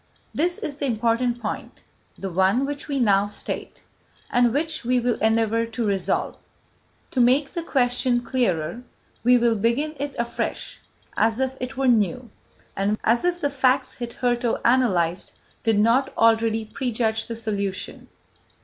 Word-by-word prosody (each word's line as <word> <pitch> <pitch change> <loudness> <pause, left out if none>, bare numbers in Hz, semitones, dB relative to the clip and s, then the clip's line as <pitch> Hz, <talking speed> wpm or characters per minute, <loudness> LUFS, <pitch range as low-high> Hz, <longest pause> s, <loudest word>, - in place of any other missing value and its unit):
This 350 +3 0
is 285 -2 -5
the 280 - -2
important 235 +1 0
point, 215 -3 -6 0.3
the 195 -1 -5
one 190 +9 +2
which 285 0 -5
we 280 -2 -1
now 200 -4 +3
state, 205 - -6 0.5
and 245 -1 +3
which 310 +4 -1
we 250 +1 +2
will 240 -1 0
endeavour 225 +1 +2
to 230 0 -3
resolve. 195 -3 -1 0.7
To 255 - +1
make 265 +4 +3
the 340 - -2
question 250 -4 +1
clearer, 235 -6 -1 0.4
we 245 +1 +6
will 235 -1 +2
begin 235 +9 0
it 285 0 -4
afresh, 235 0 -4 0.3
as 225 +2 +1
if 265 0 -1
it 255 +1 -5
were 270 -1 +1
new, 240 +1 +1 0.4
and 200 +2 0
as 235 +2 +2
if 350 0 0
the 285 -4 -1
facts 260 -1 +2
hitherto 240 0 -1
analysed 190 -9 +2 0.3
did 225 -2 +2
not 230 +6 +3
already 225 -1 +3
prejudge 225 -2 -1
the 230 - -5
solution. 200 -4 -4
240 Hz, 150 wpm, -24 LUFS, 220-260 Hz, 0.7 s, we